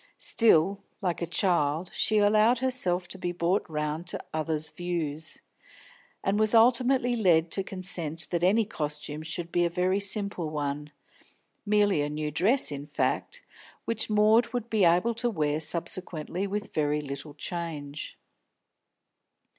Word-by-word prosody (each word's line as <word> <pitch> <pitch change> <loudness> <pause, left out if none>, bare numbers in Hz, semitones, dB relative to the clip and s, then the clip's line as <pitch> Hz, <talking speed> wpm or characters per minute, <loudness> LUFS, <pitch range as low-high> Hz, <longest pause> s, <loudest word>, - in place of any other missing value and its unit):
Still, 200 -3 +3 0.2
like 180 -5 -2
a 170 - -1
child, 170 -2 +1
she 215 - +2
allowed 215 +4 +4
herself 210 -9 +1
to 190 - -8
be 175 -1 -2
brought 175 +3 0
round 150 +2 -3
to - - -4
others' 155 0 -2
views, 160 -3 -4 0.8
and 200 +2 +1
was 215 +1 +2
ultimately 245 +2 +4
led 170 -7 +3
to 195 - -1
consent 175 -4 -2
that 170 -2 0
the 210 +5 +3
costume 150 -6 -4
should 165 +1 -4
be 175 - +2
a 170 - +2
very 180 +3 +1
simple 200 -4 -2
one, 150 0 -4 0.8
merely 205 -5 +3
a 145 - -1
new 150 0 -3
dress, 215 - +3
in 145 0 -6
fact, 145 - -2 0.4
which 225 -1 -2
Maud 215 +2 +4
would 240 -2 -3
be 210 -4 +3
able 180 +8 +3
to 240 +2 0
wear 150 -7 0
subsequently 170 +2 -1
with 205 +2 -5
little 145 -1 -2
change. 150 -3 -5
175 Hz, 140 wpm, -28 LUFS, 155-210 Hz, 0.8 s, allowed